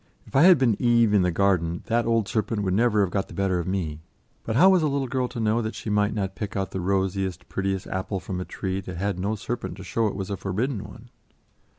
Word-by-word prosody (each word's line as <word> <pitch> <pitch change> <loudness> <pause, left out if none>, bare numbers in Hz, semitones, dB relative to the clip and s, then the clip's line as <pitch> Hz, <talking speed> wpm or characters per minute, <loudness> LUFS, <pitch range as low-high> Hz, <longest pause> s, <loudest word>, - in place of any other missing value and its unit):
If - - -13
I 135 - +6
had 185 -2 +8
been 120 -6 +1
Eve 115 -3 +4
in 100 - +5
the 90 - +2
garden, 85 -2 +1
that 115 0 +1
old 115 -3 +2
serpent 110 -1 -1
would 95 -2 0
never 110 0 +3
have 95 -3 +1
got 100 - -1
the - - -11
better 95 -2 +1
of 85 - -4
me; 85 -5 -2 0.4
but 110 - -3
how 185 +9 +7
was 185 -2 +4
a 155 - +2
little 140 -1 0
girl 125 0 -1
to 120 0 -7
know 110 +1 +1
that 110 0 -4
she 105 - -5
might 105 +1 +1
not 95 -2 -2
pick 100 0 -5
out 95 -1 -2
the 95 - -3
rosiest, 95 -1 -1
prettiest 95 0 -2
apple 95 +1 -3
from 90 -1 -5
a - - -2
tree 95 0 -3
that 90 -2 -7
had 95 0 -2
no 100 +4 -1
serpent 115 +2 -5
to 95 - -8
show 110 +5 0
it 100 - -3
was 95 0 -4
a 100 - -2
forbidden 100 +5 -2
one? 115 +3 -13
100 Hz, 260 wpm, -25 LUFS, 95-115 Hz, 0.4 s, had